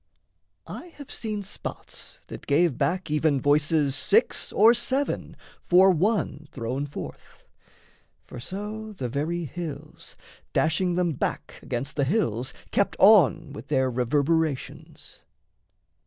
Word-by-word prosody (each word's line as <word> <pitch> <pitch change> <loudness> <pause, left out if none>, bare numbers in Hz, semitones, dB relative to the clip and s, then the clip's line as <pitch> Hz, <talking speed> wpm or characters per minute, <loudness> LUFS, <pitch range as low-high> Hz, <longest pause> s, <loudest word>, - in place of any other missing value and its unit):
I - - -8
have 285 -2 -10
seen 215 -3 -4
Spots 195 - -8
that - - -10
gave 150 0 +3
back 180 +2 -1
even 150 -2 +2
voices 145 0 +2
six 420 - +2
or 225 +3 +6
seven 260 +4 -1 0.2
For 185 +2 +5
one 175 -5 0
thrown 130 +4 -3
forth 145 - -10 0.8
for 125 - -9
so 210 - -6
the 130 -11 -4
very 160 +6 -2
hills, 165 -1 -7 0.4
Dashing 175 +3 +1
them 180 -1 +1
back 140 - -4
against 125 +5 -4
the 140 - +2
hills, 130 - 0 0.2
kept 200 - +1
on 165 -7 +5
With - - -9
their 130 -1 +1
reverberations. 145 +4 -1
160 Hz, 120 wpm, -26 LUFS, 140-195 Hz, 0.8 s, or